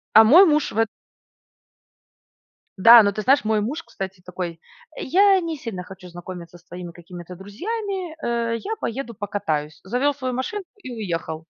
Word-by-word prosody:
А 220 - +10
мой 335 - +8
муж 300 -3 +2
в 215 - -8
э 225 - +4 1.9
Да, 230 +3 +9
но 200 - +2
ты 215 +2 -4
знаешь, 260 0 +3
мой 215 -1 +1
муж, 290 +10 -4
кстати, 190 - -7
такой: 175 -2 -5 0.4
"Я 390 +5 +4
не 330 -3 -4
сильно 225 -10 -6
хочу 185 -1 -12
знакомиться 175 0 -9
с 175 - -24
твоими 175 -1 -9
какими-то 175 +1 -11
друзьями". 365 - -5
Э, 235 -1 -1
"Я 430 - -4
поеду 235 0 -4
покатаюсь". 155 -8 -3
Завёл 250 +8 0
свою 255 -2 -4
машинку 355 - -4
и 255 - -7
уехал. 165 -8 -4
220 Hz, 160 wpm, -23 LUFS, 180-285 Hz, 1.9 s, А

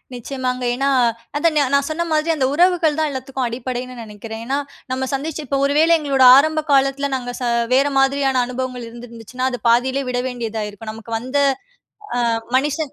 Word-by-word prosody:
நிச்சயமாங்க. 255 0 -4
ஏன்னா, 275 +2 0 0.5
அத 335 +3 +3
நா 295 - +4
நான் 280 0 +3
சொன்ன 320 +2 -1
மாரி 310 +1 +1
அந்த 270 -4 +1
உறவுகள் 340 -2 +3
தான் 310 -1 +1
எல்லாத்துக்கும் 260 0 -4
அடிப்படைன்னு 250 +1 -5
நினைக்கிறேன். 220 +1 -8
ஏன்னா, 270 +3 -1 0.3
நம்ம 260 0 -2
சந்திச்சு 305 +3 -3
இப்ப 275 +2 0
ஒரு 280 - +1
வேள 325 +1 +4
எங்களோட 275 -3 +2
ஆரம்ப 310 +2 +2
காலத்தில 275 0 +2
நாங்க 245 -1 -4
ச - - -2 0.3
வேற 275 +2 +4
மாதிரியான 270 -1 +2
அனுபவங்கள் 250 -1 -5
இருந்திருந்துச்சுன்னா, 235 +1 -6
அது 245 - -4
பாதியிலே 260 +4 +2
விட 245 0 -1
வேண்டியதாயிருக்கும். 220 -3 -5
நமக்கு 225 +1 -9
வந்த 255 +4 -3 1.0
அ - - +1 0.2
மனுஷன் 290 +2 -1
260 Hz, 165 wpm, -20 LUFS, 245-280 Hz, 1.0 s, நா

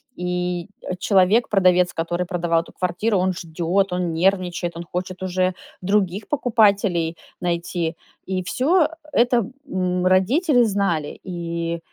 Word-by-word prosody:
И, 180 0 -2
э, 185 - -4
человек, 200 +4 +3
продавец, 180 -3 +3
который 175 +2 -2
продавал 170 -2 0
эту - - -15
квартиру, 185 +4 0
он 185 +1 +1
ждет, 175 +3 -1
он 180 -2 -1
нервничает, 175 -1 0
он 170 - -5
хочет 180 +2 -5
уже 185 0 0 0.3
других 195 +1 0
покупателей 205 - +2 0.2
найти, 170 -1 -2 0.3
и 185 -1 -2
всё 315 - +2
э - - +1 0.3
это, 240 -3 +3 0.2
м, 180 -4 -1
родители 245 - +3
знали. 195 -8 -1
И, 170 -2 -3
180 Hz, 130 wpm, -22 LUFS, 175-200 Hz, 0.3 s, человек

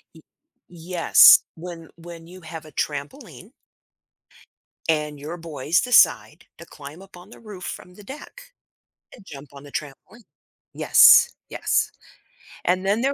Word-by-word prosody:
Y 160 - -16 0.5
yes, 175 0 +4
when 165 -1 -11
when 165 -1 -13
you 185 +1 -14
have 160 -1 -10
a 155 - -15
trampoline 185 - -7 1.4
And 150 -2 -2
your 155 +5 -8
boys 160 -1 -2
decide 250 -1 +2
to - - -13
climb 145 +4 -13
up 195 -2 -16
on 180 +3 -16
the - - -15
roof 205 -5 -12
from 180 0 -9
the 205 - -15
deck, 295 - -12 0.7
and 230 - -18
jump 140 -5 -12
on 140 - -13
the 145 - -14
trampoline, 150 - -9 0.5
yes, - - +5 0.2
yes, - - -2 0.7
and 185 +1 0
then 205 +4 0
there 270 +2 -1
170 Hz, 140 wpm, -22 LUFS, 150-195 Hz, 1.4 s, yes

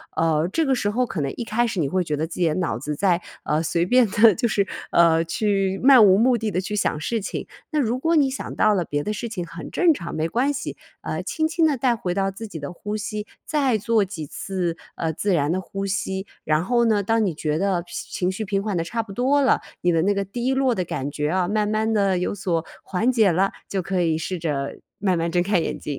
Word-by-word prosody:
呃， 160 0 +2
这 325 - +2
个 270 - +2
时 205 -4 0
候 250 +3 +1
可 190 - -5
能 140 - -1
一 240 - -4
开 235 +2 +1
始 210 -5 -3
你 140 -4 +1
会 185 -1 +1
觉 150 -2 -2
得 155 +2 -1
自 165 - -9
己 170 - +3
的 155 - +1
脑 165 -11 -1
子 150 +2 -4
在， 180 0 +2 0.2
呃， 155 +1 0
随 170 +2 +1
便 250 0 +5
地 210 +1 +6
就 235 - +1
是， 200 -3 +1 0.2
呃， 165 -1 +5
去 195 +1 0
漫 260 -5 +8
无 190 0 +6
目 245 +1 +4
的 220 -1 -2
地 185 - 0
去 210 +2 -4
想 150 -6 0
事 225 +7 -2
情。 - - -5 0.2
那 305 - +1
如 240 -1 +1
果 330 +3 +2
你 280 -3 +4
想 265 - -6
到 215 -1 +4
了 175 -3 0
别 145 0 -2
的 210 - -2
事 235 +3 -4
情 180 -6 -4
很 170 - -8
正 345 -3 +4
常， 170 -2 -6
没 160 +1 0
关 270 +5 +1
系。 285 - -5 0.3
呃， - - -3
轻 315 -1 0
轻 330 0 +1
地 290 - +1
带 240 -1 +2
回 180 -5 -3
到 195 0 0
自 220 +3 -8
己 165 -6 -7
的 145 +4 -6
呼 210 +4 -5
吸， 210 0 -4 0.2
再 275 -7 +1
做 225 -2 +2
几 170 -6 -6
次， 180 -2 -3 0.2
呃， 160 -1 -1
自 200 +4 0
然 150 -1 +1
的 185 - 0
呼 195 +1 -5
吸。 190 0 -2 0.2
然 155 +2 +1
后 240 0 +2
呢， 215 -2 +3
当 225 +2 +1
你 180 - -1
觉 150 0 -2
得 190 -2 +1
平 175 - -11 0.2
情 180 0 0
绪 215 +3 -4
平 195 0 0
缓 205 -5 -1
得 165 - 0
差 230 +6 -2
不 215 -3 -11
多 265 +7 +2
了， 260 - +3 0.2
你 175 - +3
的 165 0 +2
那 205 +1 +3
个 200 0 -1
低 240 +6 -2
落 265 -3 +2
的 180 - -1
感 140 -1 -3
觉 150 +1 -2
啊， 180 0 +1
慢 210 +1 +1
慢 215 +1 0
地 195 -4 +2
有 180 - -2
所 170 -4 -1 0.2
缓 225 +7 +1
解 220 -6 +4
了， 190 +4 +2 0.2
就 195 -2 -2
可 185 0 -1
以 160 -2 +1
试 185 +3 -3
着， 145 -4 -2 0.2
慢 185 -4 +1
慢 165 +1 0
睁 175 - +2
开 190 -1 +2
眼 - - -2
睛。 145 - -4
195 Hz, 280 characters per minute, -23 LUFS, 170-225 Hz, 0.3 s, 漫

